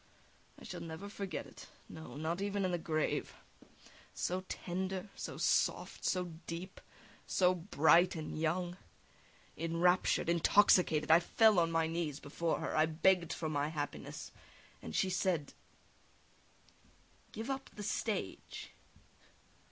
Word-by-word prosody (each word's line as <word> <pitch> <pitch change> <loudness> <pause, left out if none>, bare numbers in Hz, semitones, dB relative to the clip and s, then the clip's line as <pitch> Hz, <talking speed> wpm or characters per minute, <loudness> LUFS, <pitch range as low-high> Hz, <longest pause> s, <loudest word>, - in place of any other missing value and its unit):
I - - -14
shall - - -7
never 165 +4 -7
forget 200 -2 -5
it, - - -13 0.2
no, 160 -6 -10
not 165 +4 -2
even 200 -1 0
in 185 - 0
the 175 - -1
grave; 155 -1 -1 0.8
so 185 +1 -1
tender, 190 +2 -3
so - - -6
soft, - - +1
so 180 -1 +1 0.2
deep, 175 +3 -6 0.5
so 180 -1 +3
bright 175 0 +4
and 155 -2 -5
young! 175 +3 -1 0.8
Enraptured, 165 +2 +2
intoxicated, 170 -2 +4
I 165 - +9
fell 215 +3 +4
on 165 -1 +2
my 165 0 +2
knees 160 -3 -2
before 165 +3 -2
her, - - -2
I 155 +1 +4
begged 170 +1 +2
for 160 - -3
my 145 -1 0
happiness, 150 -2 -5 0.5
and 80 - -7
she 190 - +2
said: 175 -5 0 1.8
"Give 225 +5 -4
up 270 0 -4
the 210 - -6
stage!" 205 - -3
170 Hz, 130 wpm, -34 LUFS, 160-185 Hz, 1.8 s, I